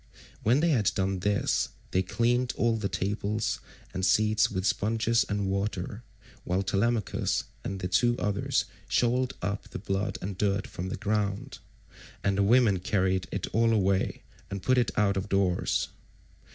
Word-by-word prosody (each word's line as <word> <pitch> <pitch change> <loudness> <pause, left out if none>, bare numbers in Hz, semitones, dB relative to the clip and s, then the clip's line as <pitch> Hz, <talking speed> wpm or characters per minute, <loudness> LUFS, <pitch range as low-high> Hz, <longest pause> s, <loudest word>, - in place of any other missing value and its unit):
When 125 +7 +3
they 170 - +3
had 110 -9 +3
done 95 -1 0
this, 100 +2 +1 0.2
they 95 - +2
cleaned 120 +6 +1
all 115 -1 +2
the 105 -3 -2
tables 100 +4 -1 0.3
and 95 - -3
seats 105 +3 +3
with 95 -2 -3
sponges 115 +3 +2
and 100 -1 0
water, 100 +1 -2 0.4
while 90 +2 0
Telemachus 105 +3 0 0.2
and 95 0 -4
the 90 - -1
two 120 +6 +2
others 105 -1 0 0.2
shovelled 125 +1 +2
up 100 +2 -3
the - - -6
blood 95 +1 -2
and 95 0 -5
dirt 100 -1 +1
from 90 +2 -5
the - - -4
ground, 105 -2 -2 0.6
and 100 -1 +2
the 100 - +2
women 105 -2 +4
carried 95 0 0
it 100 - -2
all 115 +1 +3
away 95 -3 +1 0.3
and 100 -2 -5
put 130 +5 +3
it 120 - +2
out 100 -1 +3
of 95 +1 -3
doors. 95 -3 +1
100 Hz, 160 wpm, -28 LUFS, 95-110 Hz, 0.6 s, women